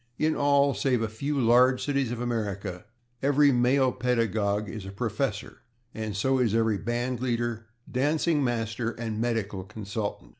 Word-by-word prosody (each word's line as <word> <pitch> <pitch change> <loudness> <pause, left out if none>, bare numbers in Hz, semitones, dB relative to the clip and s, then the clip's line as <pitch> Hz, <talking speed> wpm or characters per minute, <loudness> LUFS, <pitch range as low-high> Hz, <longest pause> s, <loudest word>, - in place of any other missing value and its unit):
In 155 0 +1
all 140 -1 +3
save 125 -5 +1
a - - 0
few 140 +7 -3
large 125 +2 +4
cities 140 -3 0
of 120 - -4
America 105 -6 -3 0.4
every 145 +1 +4
male 130 +1 +3
pedagogue 110 -4 0
is 110 -2 -6
a 95 - -7
professor, 110 +1 -3 0.3
and 110 -2 -4
so 130 +5 +2
is 115 -4 +2
every 110 -3 +2
band 120 +2 -2
leader, 120 -2 -2 0.2
dancing 150 +3 +1
master 115 -2 -1
and 110 -2 -4
medical 110 -5 -2
consultant. 105 +1 -5
120 Hz, 150 wpm, -27 LUFS, 110-130 Hz, 0.4 s, large